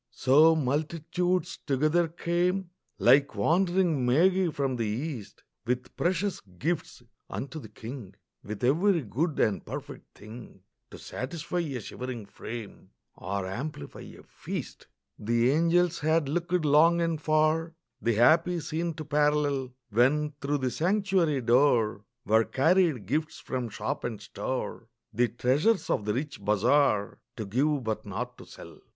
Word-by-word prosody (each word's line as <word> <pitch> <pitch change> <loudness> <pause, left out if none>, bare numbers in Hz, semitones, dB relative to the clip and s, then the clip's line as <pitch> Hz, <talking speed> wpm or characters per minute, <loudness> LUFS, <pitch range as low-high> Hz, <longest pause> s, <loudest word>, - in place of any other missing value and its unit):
So 155 +5 +5
multitudes 165 +5 -1
together 155 +5 +2
came, 175 +3 -1 0.3
Like 140 +4 +4
wandering 175 -4 +2
magi 180 +8 +3
from 140 -4 -1
the 115 -2 -1
East 120 0 -5 0.2
With 125 0 -2
precious 185 +2 0
gifts 125 - -4 0.3
unto 140 +4 -5
the - - -11
King, 115 -5 -9 0.3
With 105 +1 -7
every 165 +6 +3
good 145 - -2
and 105 - +1
perfect - - -9
thing 110 -2 -12 0.3
To - - -11
satisfy 165 +6 -4
a 145 -7 -3
shivering 120 0 -6
frame 110 +1 -9 0.3
Or 95 +1 -4
amplify 95 - -6
a - - -12
feast. - - -7 0.3
The 120 +3 +2
angels 170 +2 +2
had 155 -1 +1
looked 175 +2 -1
long 160 +4 +5
and 165 -2 -1
far 155 +2 +1 0.3
The 115 -1 +1
happy 165 +9 +4
scene 165 +1 -3
to 155 -1 -7
parallel, 145 -3 +1 0.2
When 140 +7 +3
through 145 +1 0
the 130 -2 -1
sanctuary 180 - +1
door 115 -4 +3 0.2
Were 110 0 +4
carried 160 - +2
gifts 155 - -2
from 125 -3 -4
shop - - -4
and 115 -4 -4
store, 115 +2 -5 0.3
The 120 +3 +2
treasures 135 - +1
of 105 - 0
the 105 - 0
rich 145 +3 -4
bazaar, 105 0 +2 0.2
To 110 - -5
give 135 +7 0
but 110 -1 -2
not - - -5
to - - -12
sell. - - -12
145 Hz, 140 wpm, -28 LUFS, 120-165 Hz, 0.3 s, So